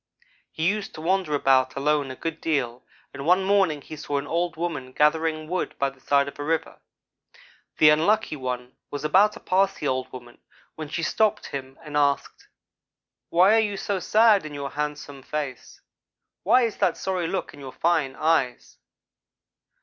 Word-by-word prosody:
He 160 +1 -1
used 205 +1 -2
to 155 - -8
wander 180 -2 0
about 130 -2 +3
alone 145 0 +1
a 130 - -6
good 165 +3 -5
deal, 130 -6 -1 0.3
and 140 0 -7
one 180 +5 +3
morning 190 -6 +2
he 155 - -9
saw 145 -1 -3
an 140 - -3
old 170 +3 -1
woman 155 -6 -4
gathering 155 +1 +1
wood 180 +2 -3
by 140 0 0
the 135 - -22
side 140 +1 +2
of 140 - -9
a - - -3
River. 160 +2 -2 1.0
The 150 -1 +7
Unlucky 170 +4 +2
one 125 -2 -5
was 145 0 -5
about 195 +7 +4
to 235 - -10
pass 195 +1 +1
the 150 - -4
old 130 -1 -2
woman 120 -1 -11 0.3
when 155 -2 -7
she 165 +2 -3
stopped 215 +4 +1
him 135 -1 -7
and 150 -2 -8
asked: 140 -1 0 0.8
"'Why 185 +5 +5
are - - +5
you 205 -2 -1
so 195 0 -2
sad 215 +1 +4
in 150 -1 -8
your 140 -1 -5
handsome 150 -1 -5
face? 140 -2 -6 0.6
Why 245 +6 +4
is 230 -2 -2
that - - +1
sorry 185 -3 -2
look 190 - -3
in 145 - -13
your 135 -2 -8
fine 155 -5 0
eyes?' 155 -6 0
155 Hz, 180 wpm, -25 LUFS, 140-180 Hz, 1.0 s, The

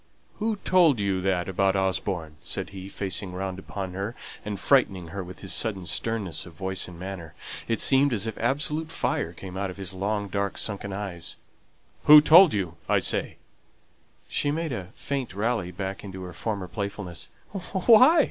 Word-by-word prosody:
"Who 220 0 0
told 170 - +5
you 100 -2 0
that 95 -2 0
about 95 +1 +2
Osborne?" 95 -4 -1
said - - -4
he, 95 0 -8
facing 95 -1 -3
round 95 0 -4
upon 95 -1 -6
her, 100 +5 -4 0.3
and 105 -2 -4
frightening 95 -11 +3
her 100 +2 -5
with 90 +1 -10
his 95 - -3
sudden 100 -5 -2
sternness 95 0 -1
of 85 - -12
voice 95 +3 -2
and 85 -2 -11
manner. 90 -4 -7 0.3
It 115 - 0
seemed 135 +1 +5
as 110 -3 0
if 110 - -3
absolute 150 +6 0
fire - - -1
came 95 -1 -9
out 95 0 -2
of 90 - -8
his 95 -1 -5
long 100 +2 -1
dark 100 0 -2
sombre 100 -1 -2
eyes. 95 -4 -4 0.7
"Who 150 0 +11
told 165 +3 +8
you, 90 -6 -2
I - - +4
say?" - - 0 0.9
She 145 - 0
made 160 +1 -1
a 95 -6 -5
faint 135 -8 -4
rally 110 -3 0
back 95 +2 -5
into 95 -2 -7
her 90 -1 -7
former 100 -1 -3
playfulness. 100 -4 -5 0.2
"Why? 220 - +5
100 Hz, 175 wpm, -26 LUFS, 95-115 Hz, 0.9 s, Who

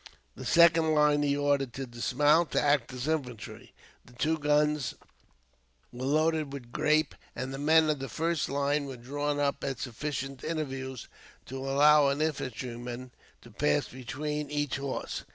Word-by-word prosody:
The - - -8
second 165 -2 +5
line 150 -1 +4
he 145 -1 +1
ordered 140 -3 +1
to 135 - -4
dismount, 145 +7 +2
to - - +3
act 145 -5 +2
as 125 +2 -5
infantry. 130 -8 -4 0.3
The 125 - -18
two 155 +6 0
guns 150 -3 +1 1.0
were 125 +2 -5
loaded 155 0 +1
with 125 -4 -8
grape, 155 +2 +2 0.2
and 130 +1 -4
the 135 - -5
men 160 +2 +5
of 150 -2 0
the 135 -1 -5
first 165 +4 -1
line 140 +1 0
were 135 -2 -7
drawn 145 +4 -2
up 140 -1 0
at 135 -2 -2
sufficient 135 +2 -5
intervals 135 -5 -4 0.4
to 135 - -7
allow 145 +2 +5
an 140 +1 0
infantryman 125 -4 -4 0.3
to - - -14
pass 75 - +1
between 145 +4 -4
each 145 -2 -1
horse. 140 -1 -4
145 Hz, 155 wpm, -29 LUFS, 130-150 Hz, 1.0 s, second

